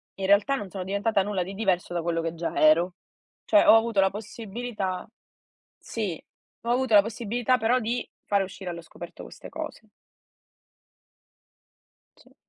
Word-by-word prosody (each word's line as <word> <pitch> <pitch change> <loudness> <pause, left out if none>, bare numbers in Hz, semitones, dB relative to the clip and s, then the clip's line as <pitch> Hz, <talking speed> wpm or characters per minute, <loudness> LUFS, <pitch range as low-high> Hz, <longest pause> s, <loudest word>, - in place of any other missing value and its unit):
in 195 - -4
realtà 205 +8 +4
non 205 -7 -5
sono 190 0 -5
diventata 200 +2 +1
nulla 200 -1 -1
di 190 +3 -7
diverso 190 -4 0
da 175 - -1
quello 165 0 -1
che 165 0 -3
già 165 0 -3
ero. 170 +4 +4 0.5
Cioè, 310 - +5
ho - - +9
avuto 225 -2 +2
la 190 - +4
possibilità 210 -2 -5 0.7
sì, 200 -8 -4 0.4
ho 235 - -5
avuto 250 -1 +1
la 205 - +9
possibilità 235 +3 0
però 240 +2 +2
di 240 +1 -2 0.2
fare 200 -1 +2
uscire 185 0 -7
allo 170 -1 -6
scoperto 165 - -11
queste - - -11
cose. - - -7 2.3
Sì. - - -22
200 Hz, 155 wpm, -26 LUFS, 185-230 Hz, 2.3 s, ho